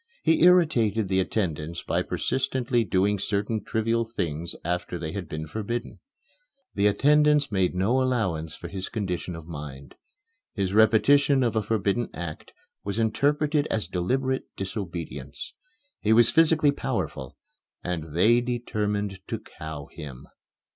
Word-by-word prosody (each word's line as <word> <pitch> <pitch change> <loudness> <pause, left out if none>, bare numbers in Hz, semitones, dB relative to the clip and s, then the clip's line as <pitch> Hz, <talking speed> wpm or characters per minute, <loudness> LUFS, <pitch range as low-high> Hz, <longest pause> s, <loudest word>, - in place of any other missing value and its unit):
He 160 0 +3
irritated 125 - +4
the 95 -1 +2
attendants 85 -5 -2
by - - 0
persistently 130 -3 0
doing 100 0 +1
certain 105 +2 -1
trivial 115 +1 0
things 85 -8 -4
after 90 +1 -2
they 80 -2 -4
had 90 -2 -5
been 80 0 -4
forbidden. 110 +7 -4 0.7
The 100 +1 +3
attendants 150 +4 +4
made 95 -3 +1
no 110 +8 +2
allowance 95 -12 -1
for 85 - -8
his 95 +1 -5
condition 90 -4 -3
of 80 -1 -9
mind. 70 -4 -8 0.6
His 95 -2 -1
repetition 130 +6 +5
of 115 -2 0
a 110 - +2
forbidden 105 +2 0
act 85 -3 -7 0.3
was 100 +1 -3
interpreted 145 +6 +1
as 110 - -2
deliberate 130 +9 -1
disobedience. 85 - -6 0.5
He 110 - +2
was 115 0 +6
physically 160 -2 +4
powerful, 65 - -4 0.5
and 80 -4 -4
they 115 +7 +5
determined 105 -5 -2
to - - -2
cow 80 -2 -8
him. 70 -6 -9
105 Hz, 135 wpm, -26 LUFS, 85-120 Hz, 0.7 s, was